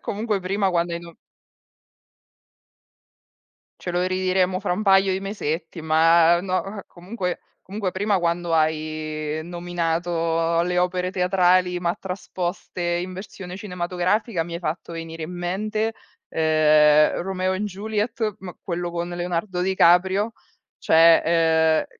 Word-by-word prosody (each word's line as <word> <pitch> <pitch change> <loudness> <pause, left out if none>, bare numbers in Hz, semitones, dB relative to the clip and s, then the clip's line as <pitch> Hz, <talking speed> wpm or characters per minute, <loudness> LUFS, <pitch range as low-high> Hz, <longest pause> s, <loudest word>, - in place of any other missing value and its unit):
Comunque 210 -1 -2
prima 195 +1 0
quando 170 -1 0
hai 170 - -2
no 170 -1 -13 2.6
Ce 180 - -4
lo 175 +1 0
ridiremo 185 0 0
fra 200 -3 -1
un 200 - -2
paio 195 -1 +4
di 190 - -2
mesetti, 165 -5 -4
ma 165 +2 +4
no 195 +2 -3
eh, 195 - -8
comunque 180 0 -5 0.2
comunque 200 0 -4
prima 200 0 +1
quando 170 0 -1
hai 155 -1 -1
nominato 170 -1 -1
le 180 +1 -1
opere 180 0 0
teatrali 180 -1 +2
ma 170 0 0
trasposte 180 -1 -5
in 175 +1 -1
versione 185 -1 -8
cinematografica 180 +1 -1
mi 170 - -9
hai - - -3
fatto 170 0 -4
venire 165 0 -7
in 170 - -8
mente, 215 +5 -2 0.3
ehm, 155 -1 +4
Romeo& 185 0 -1
Juliet, 215 +2 -2
ma 185 -2 -8
quello 175 -1 -3
con 170 0 -3
Leonardo 175 +1 -3
Di 190 +1 0
Caprio, 190 +5 +4 0.5
cioè, 165 +1 +6
ehm, 160 -1 +3
180 Hz, 130 wpm, -23 LUFS, 165-190 Hz, 2.6 s, cioè